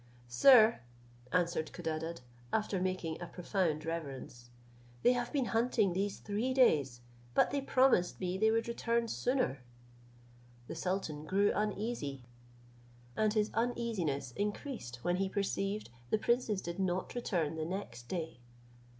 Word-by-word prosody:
"Sir," 220 - +7 0.5
answered 170 -3 0
Codadad, 165 -2 -4 0.3
after 210 -3 0
making 185 -3 -2
a 175 - -4
profound 175 -4 -1
reverence, 135 -7 -6 0.5
"they 245 - +6
have 245 -1 -2
been 275 -4 +1
hunting 225 -4 +2
these 195 +2 -1
three 225 +6 -2
days, 140 - +3 0.3
but - - +4
they 280 0 0
promised 260 -9 +3
me 180 -1 -2
they 220 +3 +3
would 225 +1 +1
return 235 0 0
sooner." 245 - 0 1.0
The - - -6
sultan 165 -3 -3
grew 200 +5 +3
uneasy, 205 - -2 0.9
and 215 -1 +2
his 210 -1 +2
uneasiness 225 - -1
increased 205 - -4
when 175 0 +1
he 195 0 0
perceived 200 - -2 0.2
the - - +3
princes 225 -3 +1
did 170 +2 -5
not 185 -1 -1
return 180 -11 -1
the 160 -1 -3
next 160 -10 -5
day. 160 -5 -4
190 Hz, 135 wpm, -33 LUFS, 160-225 Hz, 1.0 s, Sir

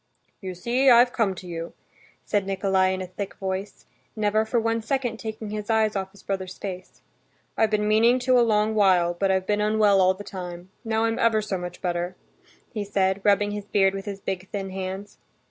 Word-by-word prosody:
"You 185 -2 -5
see, 245 +9 +2
I've 245 0 +6
come 205 -5 +1
to 185 - -10
you," 170 -1 -6 0.5
said 200 -2 0
Nikolay 190 -1 +2
in 185 0 -3
a - - -5
thick 190 +2 -6
voice, 190 +1 -5 0.3
never 215 0 +1
for 235 +2 +1
one 230 0 0
second 245 0 -2
taking 220 -1 -6
his 210 0 -5
eyes 220 -1 +2
off 190 -1 -2
his 200 - -18
brother's 190 -1 -4
face. 185 -2 -8 0.5
"I've 220 - +3
been 210 -1 +1
meaning 225 +4 +4
to 255 0 +4
a - - +5
long 215 -1 +2
while, 185 -5 +3
but 195 +3 0
I've 190 -1 +1
been 210 +1 0
unwell 210 -2 +4
all 185 0 +4
the 205 - -9
time. 180 -2 -8
Now 225 -1 0
I'm 225 0 -1
ever 230 -1 +3
so 210 -2 -3
much 180 0 -8
better," 175 0 -2 0.6
he 215 -2 -2
said, 195 -1 0
rubbing 205 0 +3
his 205 -1 -5
beard 195 -1 +2
with 195 0 -5
his 200 -2 -5
big 190 -1 -5
thin 195 -2 -4
hands. 190 +2 -6
200 Hz, 205 wpm, -25 LUFS, 190-220 Hz, 0.6 s, I've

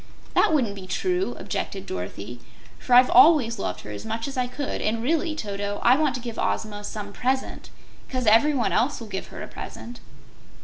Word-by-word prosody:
"That - - +4
wouldn't 255 -10 +2
be 190 -2 -9
true," 365 - -1
objected 195 -1 -4
Dorothy, 100 +6 -6 0.4
"for 245 - +2
I've 250 +1 +7
always 265 -8 +6
loved 90 - -3
her 105 - -9
as 105 -1 -7
much 225 +2 -3
as 275 - -6
I 250 -1 0
could, 280 +3 -4
and, 225 +1 -1
really, 320 +3 0
Toto, 205 -5 -4
I 245 +2 +6
want 295 -3 +1
to 250 - -5
give 235 -2 -6
Ozma 210 -1 -2
some 205 -1 -6
PRESENT, 260 +3 -2 0.4
'cause 255 -2 -2
everyone 235 +3 +4
else 260 +5 +1
will 230 - -7
give 190 -2 -5
her - - -8
a - - -7
present." 240 +1 -9
235 Hz, 190 wpm, -25 LUFS, 205-270 Hz, 0.4 s, I've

